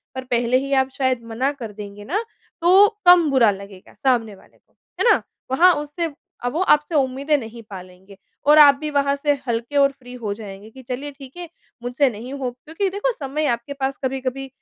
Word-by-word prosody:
पर 260 - -4
पहले 240 0 +1
ही 275 +1 -3
आप 265 - -12
शायद 260 -3 0
मना 260 +5 0
कर 240 -6 -8
देंगे 205 0 -9
ना, 400 - -1 0.4
तो 375 +4 +7 0.2
कम 355 -3 +7
बुरा 250 -5 +5
लगेगा 195 -1 -11
सामने 235 -6 0
वाले - - -22
को। - - -40 0.3
है 485 - +4
ना? - - +3 0.3
वहाँ 350 +7 +6
उससे 300 +2 -4 0.3
अ, - - -1
वो 320 +8 -2
आपसे 300 -3 +2
उम्मीदें 275 +2 +1
नहीं 230 -2 -8
पालेंगे, 185 0 -12 0.3
और 300 +1 +6
आप 290 -2 +9
भी 305 - -3
वहाँ 280 -1 +1
से 290 +1 +1
हल्के 235 +3 -3
और 280 0 +5
फ्री 250 -2 -14
हो 225 -5 -4
जाएँगे 205 -1 -10
कि 265 - -13
चलिए, 275 +4 -4
ठीक 275 +1 -14
है, 350 -1 -7 0.4
मुझसे 250 +3 +1
नहीं 240 +4 -8
हो 270 -3 -3
क्योंकि 320 +10 -4
देखो, 410 +6 -1
समय 295 +2 -3
आपके 235 +4 -6
पास 270 -1 -3
कभी-कभी 265 0 -3
265 Hz, 200 wpm, -21 LUFS, 235-295 Hz, 0.4 s, आप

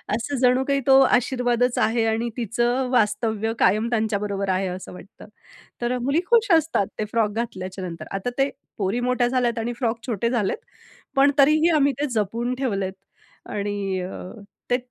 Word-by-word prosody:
असं 255 +5 -3
जणू 250 +1 +4
काही 275 0 +2
तो 270 0 +7
आशीर्वादच 245 -1 +2
आहे 225 0 +2
आणि 225 +2 0
तिचं 240 +3 0
वास्तव्य 220 -1 +1
कायम 215 +5 +3
त्यांच्याबरोबर 205 -3 -1
आहे 190 +1 +1
असं 180 0 -7
वाटतं. 195 +4 -13 0.6
तर 245 +1 0
मुली 275 +7 +1
खुश 470 -2 +4
असतात 310 -10 +1
ते 215 - 0
फ्रॉक 225 -2 +2
घातल्याच्या 190 -4 -5
नंतर. 165 -2 -7
आता 195 +5 -2
ते 270 +1 +3 0.3
पोरी 200 +4 0
मोठ्या 245 0 +1
झाल्यात 245 -2 0
आणि 235 +2 -2
फ्रॉक 230 -3 -1
छोटे 235 0 -1
झालेत, 225 - 0 0.6
पण 275 +1 +6
तरीही 305 +4 +5
आम्ही 280 -1 +3
ते 295 - +1
जपून 230 +4 -1
ठेवलेत 200 -8 -2 0.6
आणि 200 -2 -2
अ 180 +1 -6 0.5
ते 245 - +4
235 Hz, 160 wpm, -23 LUFS, 205-250 Hz, 0.6 s, तो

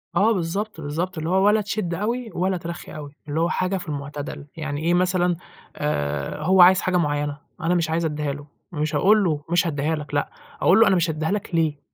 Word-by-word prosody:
آه 215 +3 +4
بالضبط، 195 +1 -3
بالضبط، 165 +5 -3
اللي 160 +1 -2
هو 190 +2 +3
ولا 210 +1 +4
تشد 205 -4 -2
أوي 230 +6 -2
ولا 185 +1 0
ترخّي 170 0 -7
أوي، 145 -2 -7 0.2
اللي 150 +2 -1
هو 170 +1 +2
حاجة 185 +1 0
في 180 - -8
المُعتدَل، 145 0 -6
يعني 155 -2 -3
إيه 170 +1 +2
مثلًا 180 0 +2 0.4
آآ 75 - -2
هو 185 +3 +5
عايز 185 +2 +7
حاجة 185 -1 +1
معيّنة، 145 -3 -1 0.2
أنا 170 +2 +1
مش 170 -2 +1
عايز 165 +1 0
أدّيها 150 -2 -2
له، 145 +1 -10 0.2
مش 155 -2 -2
هاقول 210 +1 +4
له 155 -5 0
مش 175 +1 +2
هادّيها 155 +1 0
لك 150 -2 -8
لأ، 145 - 0 0.3
أقول 190 +5 +5
له 225 - +7
أنا 190 - +4
مش 170 -2 +1
هادّيها 155 +1 -1
لك 200 -3 -2
ليه 155 -3 +1
165 Hz, 215 wpm, -23 LUFS, 150-185 Hz, 0.4 s, عايز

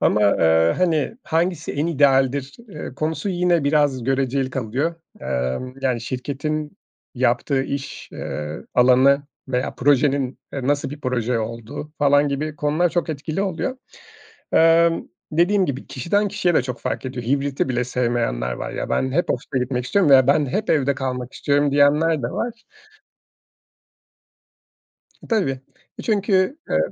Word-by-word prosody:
ama, 105 - +3 0.2
eee, 80 0 +4
hani, 170 - +1
hangisi 170 0 -1
en 145 +3 -1
idealdir, 135 -2 +2
eee, 150 -7 -8
konusu 160 +7 -2
yine 175 -3 +1
biraz 140 -4 +2
göreceli 135 0 0
kalıyor. 130 +7 -2 0.3
Emm, 65 - -3
yani, 125 -3 0
şirketin 145 - -4 0.4
yaptığı 130 +2 +1
iş, 140 0 -5
eee, 75 +1 -5
alanı 130 +3 +5 0.3
veya 125 0 -1
projenin, 140 -1 +2
eee, 135 -2 -4
nasıl 145 -1 0
bir 145 +1 -8
proje 125 -3 -1
olduğu 115 +6 -6
falan 145 0 +4
gibi 150 +2 -3
konular 150 +4 +1
çok 175 -1 -1
etkili 155 +5 -3
oluyor. 200 +7 -2 0.8
Emm, 165 +1 +4 0.2
dediğim 180 +4 +3
gibi, 135 -1 -4
kişiden 200 - 0
kişiye 185 -4 0
de - - +4
çok 125 -1 -6
fark - - -3
ediyor. 125 -2 -5
Hibriti 140 +1 0
bile 125 -1 0
sevmeyenler 120 - -1
var. 65 - -5
"Ya, - - -4
ben 130 0 0
hep 175 +4 +1
ofise 130 +1 -2
gitmek 125 0 -2
istiyorum 190 -2 +2
veya 130 -2 +7
ben 145 +1 +3
hep 210 +10 -2
evde 140 -2 +2
kalmak 130 -1 -4
istiyorum." 145 0 +1
diyenler 145 +1 +3
de - - 0
var. 240 - -2 2.8
Tabii. 215 -11 +2
Eee, 130 - -6 0.4
çünkü, 200 +4 +1
eee, - - +2
140 Hz, 145 wpm, -22 LUFS, 125-160 Hz, 2.8 s, veya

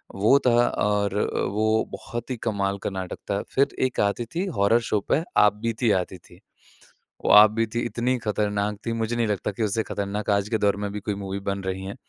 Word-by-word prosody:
वो 110 +8 +5
था 120 0 +4
और 105 -1 0 0.4
वो 110 +1 +1
बहुत 120 +1 -6
ही - - -1
कमाल 100 -3 -1
का - - -1
नाटक 95 -2 -5
था। 100 - 0
फिर 135 +1 +4 0.2
एक 125 - -7
आती 105 +4 0
थी 180 +4 0
हॉरर 100 +4 +4
शो 105 - +2
पे 160 - +2 0.2
आपबीती 110 +2 +2
आती 90 +1 -8
थी। - - -19 0.9
वो - - +3
आपबीती 110 +2 +5
इतनी 120 +2 0
ख़तरनाक 105 -1 -1
थी 115 - -1
मुझे 115 +1 -2
नहीं 115 -2 +1
लगता 105 0 -1
कि 110 - -3
उससे 110 +1 0
ख़तरनाक 100 +1 -4
आज 100 +1 +1
के 110 - +1
दौर 100 -1 +2
में 100 0 -3
भी 105 - -3
कोई 105 0 -3
मूवी 100 0 -5
बन 100 0 -3
रही 95 0 -3
हैं। 100 +4 -6
105 Hz, 205 wpm, -24 LUFS, 100-115 Hz, 0.9 s, वो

